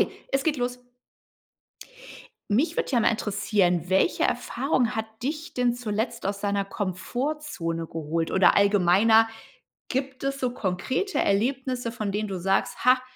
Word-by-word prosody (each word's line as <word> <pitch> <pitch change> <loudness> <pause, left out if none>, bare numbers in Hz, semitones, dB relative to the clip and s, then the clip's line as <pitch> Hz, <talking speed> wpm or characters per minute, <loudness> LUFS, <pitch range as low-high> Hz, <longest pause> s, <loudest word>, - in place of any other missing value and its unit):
Okay, - - -1
es 270 0 +1
geht 305 -3 +1
los. 245 0 -3 1.7
Mich 270 +11 +2
würde 485 - -1
ja 245 - +3
mal - - +3
interessieren, 200 -5 0
welche 190 0 +2
Erfahrung 245 0 0
hat 220 0 -2 0.2
dich 305 +4 -4
denn 245 -1 +2
zuletzt 230 0 -3
aus 200 0 -2
deiner 200 -1 0
Komfortzone 195 - -3
geholt, 165 +1 -2
oder 190 - +4
allgemeiner, 205 +3 +5 0.6
gibt 265 0 -3
es 275 0 -1
so 255 -2 -1
konkrete 255 - -2
Erlebnisse, 245 +3 0
von 215 -3 -3
denen 210 +2 -2
du 195 -2 -4
sagst: 195 +2 0
„Ha, 255 +1 +5
225 Hz, 140 wpm, -26 LUFS, 195-255 Hz, 1.7 s, allgemeiner